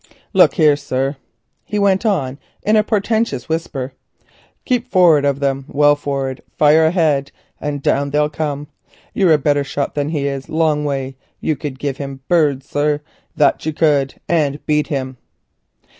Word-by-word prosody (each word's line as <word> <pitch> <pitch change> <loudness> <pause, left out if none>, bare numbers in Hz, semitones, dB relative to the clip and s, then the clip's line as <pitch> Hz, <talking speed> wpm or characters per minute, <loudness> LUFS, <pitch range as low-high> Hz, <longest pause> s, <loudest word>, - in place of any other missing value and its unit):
Look - - +5
you 160 - +4
here, 150 -1 +6
sir," 140 -1 -2 0.5
he 210 - -4
went 200 +1 +2
on 140 -9 -1 0.2
in 215 - +3
a 215 - +4
portentous 220 - -1
whisper, 140 -5 -3 0.7
"keep 250 -1 0
forrard 170 - +5
of 140 0 0
them, 135 -1 -1
well 145 0 +4
forrard, 135 -2 -3 0.2
fire 155 +2 +5
ahead, 155 -5 +1 0.3
and 145 -1 -4
down 140 +1 +1
they'll 150 +1 +2
come 150 -1 -3
of - - -9
themselves 150 - -38
like. - - -34
You're 185 -5 +4
a - - +5
better 145 0 +1
shot 140 0 -3
than 145 0 -1
he 150 -3 -2
is 135 -1 -3
a - - -9
long 155 -2 +2
way; 135 -2 -3 0.2
you 155 - -1
could 145 -2 -6
give 140 -1 -3
him 135 -1 -7
'birds,' 145 -6 +2
sir, 145 0 0 0.3
that 145 - +2
you 155 - -1
could, 145 -4 +1
and 150 -4 0
beat 150 0 +1
him." 130 -3 -3
145 Hz, 180 wpm, -18 LUFS, 140-160 Hz, 0.7 s, here